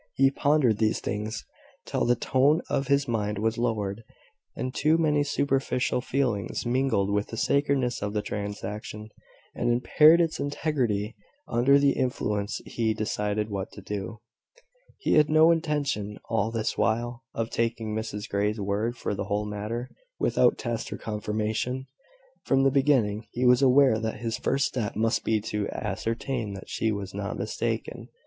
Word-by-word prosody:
He 135 0 +4
pondered 140 -7 +2
these 110 -1 +2
things 105 +2 -4 0.4
till - - -1
the 120 - +4
tone 135 +6 +3
of 135 - 0
his 140 +1 +2
mind 105 -3 -1
was 110 +2 0
lowered, 110 -3 -1 0.5
and 130 - -3
too 155 +2 +3
many 150 -3 +2
superficial 135 -3 0
feelings 125 -8 -1
mingled 120 -5 +1
with 105 0 0
the 115 - -7
sacredness 140 -2 +1
of 105 0 -2
the 105 -1 -1
transaction, 105 +1 -5 0.4
and 120 - -1
impaired 150 +7 +5
its 165 -2 +1
integrity. 125 -8 -1 0.3
Under 125 +4 +4
their 140 -1 +4
influence 105 -5 -1
he 110 -2 -1
decided 105 0 -2
what 100 -1 -4
to 100 - -10
do. 105 +3 -5 0.8
He 415 - 0
had 150 -1 +5
no 155 +2 +6
intention, 145 -11 -1
all 110 -2 +1
this 115 -1 -2
while, 120 +2 0
of 115 0 -2
taking 115 -2 -1
Mrs 110 -1 -4
Grey's 105 +2 0
word 105 +4 -1
for 115 - -2
the 100 - -3
whole 105 +1 -1
matter, 105 +4 -4 0.3
without - - +3
test 120 -1 -3
or - - -4
confirmation. 110 +4 -2 0.6
From 135 0 +2
the 135 - +4
beginning, 130 -7 +2
he 125 +1 -1
was 125 +1 +6
aware 130 -3 +5
that 110 0 -3
his 115 -1 -2
first 135 +1 +1
step 115 -5 -2
must 115 +1 +1
be 110 -1 +1
to 105 -1 -3
ascertain 115 -1 -3
that 95 - -10
she 110 - 0
was 100 -2 -4
not 100 0 -4
mistaken. - - -3
115 Hz, 160 wpm, -27 LUFS, 105-135 Hz, 0.8 s, no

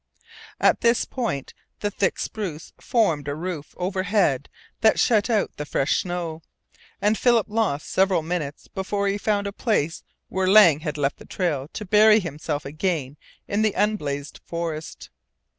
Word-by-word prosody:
At - - +3
this 235 0 +3
point 220 - -3 0.3
the 205 - -1
thick 195 -1 0
spruce 180 -8 -5
formed 165 - +1
a 145 - -2
roof 165 -2 -6
over 185 +1 -1
head 185 -9 +1 0.3
that 220 - +5
had - - -5
shut 220 -1 +3
out 215 -4 +1
the 150 - -3
fresh 140 0 +1
snow, 175 -3 -4 0.6
and 210 +1 +2
Philip 235 -1 +3
lost 210 -10 -1
several 190 -3 +2
minutes 160 -4 -4
before 200 +1 -2
he 200 +1 0
found 205 -1 0
the 200 - -4
place 185 -9 0 0.3
where 190 0 -1
Lang 185 -7 +7
had 155 -1 -4
left 140 -1 0
the - - -13
trail 150 -8 -2
to 210 - -5
bury 215 +2 +6
himself 155 -4 -4
again 150 -2 -2 0.3
in 205 +1 0
the 215 -2 +1
unblazed 150 -9 -1
forest. 165 -2 -5
185 Hz, 160 wpm, -24 LUFS, 150-210 Hz, 0.6 s, Lang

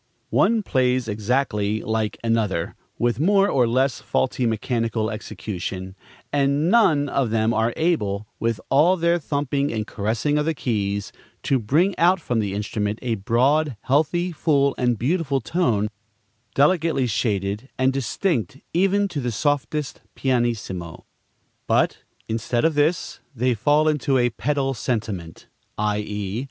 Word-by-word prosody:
One 220 +1 +3
plays 130 - +1
exactly 105 -1 0
like 110 -1 -1
another, 110 -7 0 0.2
with 120 -1 0
more 195 +5 +4
or 125 -10 +2
less 130 +3 +1
faulty 125 -1 0
mechanical 115 -1 -1
execution; 95 -3 -6 0.4
and 145 +4 +2
none 155 -12 +4
of 135 -3 0
them 110 +1 +1
are 115 +1 +1
able, 105 - 0
with 115 -2 -1
all 160 +7 +5
their 170 0 +2
thumping 140 -1 -1
and 110 -2 -2
caressing 115 +9 -1
of 150 - 0
the 165 - 0
keys, 100 -6 -2 0.3
to 135 - +2
bring 160 - +2
out 180 +2 +4
from 120 -7 -1
the 100 -2 -2
instrument 105 0 -2
a 120 -2 0
broad, 125 +6 +1
healthy, 160 +6 +1
full, 145 -4 +2
and 125 -2 +1
beautiful 145 - 0
tone, 115 - 0 0.7
delicately 155 -2 +3
shaded 105 +1 -1
and 130 +1 +2
distinct 135 - -1 0.2
even 195 +3 +2
to 165 -7 -4
the 125 -1 -2
softest 145 +3 -1
pp. 115 -10 -2 0.6
But, - - +2 0.3
instead 115 +3 -1
of 165 - +3
this, 150 +3 0 0.2
they 125 +1 +1
fall 145 +7 +2
into 145 -3 +2
a 120 -1 +2
pedal 135 +3 -1
sentiment; 105 -9 -4 0.3
_i.e. 105 0 -2
125 Hz, 135 wpm, -23 LUFS, 110-150 Hz, 0.7 s, all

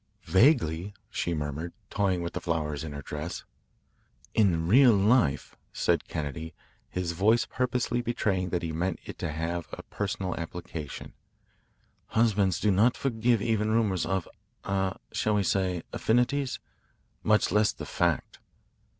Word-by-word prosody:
"Vaguely," 95 - +3 0.2
she 85 - -1
murmured, 75 +3 -4 0.2
toying 95 -4 +1
with 85 - -4
the - - -4
flowers 75 -3 -2
in 80 - -5
her 70 -1 -7
dress. 75 +5 -5 0.9
"In 85 -7 +3
real 125 +4 +7
life," 100 - +2 0.2
said - - +1
Kennedy, 80 +1 -5 0.3
his 90 -2 -2
voice 105 +7 +3
purposely 125 -1 -1
betraying 100 -6 0
that 85 0 -1
he 80 - -2
meant 85 +3 -1
it - - -8
to - - -2
have 80 +2 -3
a - - -7
personal 95 -2 -3
application, 85 -3 -6 0.9
"husbands 105 -5 +2
do 105 - +2
not 110 +6 +3
forgive 115 -4 +1
even 110 -2 +1
rumours 110 -5 +1
of 95 -1 -1 0.4
ah 95 -1 -1
shall 105 -1 +1
we 100 - +2
say 90 -2 0
affinities? 125 +4 +1 0.6
much 105 -2 +3
less 105 +1 +4
the - - -8
fact." - - -1
95 Hz, 140 wpm, -28 LUFS, 85-110 Hz, 0.9 s, real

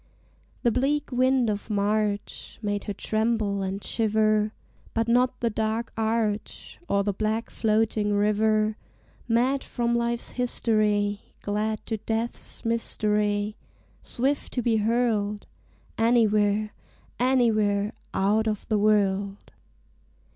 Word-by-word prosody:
The 240 - +4
bleak 275 +5 0
wind 255 0 +3
of 210 0 -3
March 205 0 -1
Made 205 -1 -2
her 205 - -3
tremble 215 -1 0
and 195 +1 -3
shiver; 215 -1 +2 0.4
But 225 0 +1
not 250 +2 +2
the 235 -1 +1
dark 220 +2 -2
arch, 220 -1 -2
Or 200 0 +2
the 205 0 0
black 215 +3 -2
floating 215 -1 +1
river; 215 +1 +2 0.5
Mad 250 +4 +2
from 235 -1 -1
life's 235 0 -1
history, 210 -4 0
Glad 215 +1 -2
to 220 - -2
death's 225 +3 -4
mystery, 210 -2 0 0.4
Swift 275 +4 -1
to 245 - -1
be 225 -1 +2
hurled 215 -2 0 0.5
Anywhere, 215 -2 +3 0.5
anywhere 220 -5 +2 0.2
Out 210 +3 +1
of 210 -2 -2
the 215 -2 +2
world! 200 -1 +1
215 Hz, 110 wpm, -26 LUFS, 205-230 Hz, 0.5 s, The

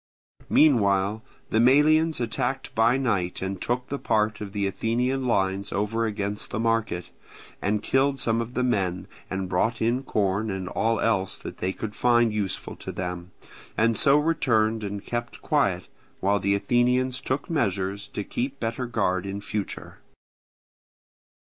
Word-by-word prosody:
Meanwhile 105 -7 +4 0.3
the 110 - +3
Melians 150 +6 +4
attacked 125 +3 -2
by 115 +3 +4
night 100 -9 0
and 95 -1 -4
took 125 +1 -2
the 140 - -3
part 105 0 0
of 100 -2 -5
the 100 -1 -1
Athenian 125 +6 0
lines 95 -2 0
over 110 +3 0
against 100 -1 -3
the - - -3
market, 115 -6 0 0.5
and 105 +1 0
killed 135 +1 +2
some 115 -1 +1
of 115 +2 -6
the 125 - +1
men, 95 -7 0 0.2
and 95 0 -2
brought 110 +6 0
in 120 +3 +1
corn 105 -3 0
and 95 -2 -3
all 115 0 +1
else 95 -4 0
that - - -9
they 95 - 0
could 105 +2 -6
find 120 -2 +3
useful 100 -3 -3
to - - -6
them, 90 -1 -5 0.5
and 115 +1 +3
so 140 +3 +5
returned 115 -9 +2
and 100 0 -5
kept 120 0 -4
quiet, - - +1 0.3
while 100 +1 +2
the 100 0 +2
Athenians 125 +4 +1
took 130 +3 -2
measures 100 - -1
to 105 - -5
keep 130 +6 -3
better 115 +2 -2
guard 100 -5 0
in 100 +1 -4
future. 105 0 -5
110 Hz, 155 wpm, -26 LUFS, 100-125 Hz, 0.5 s, so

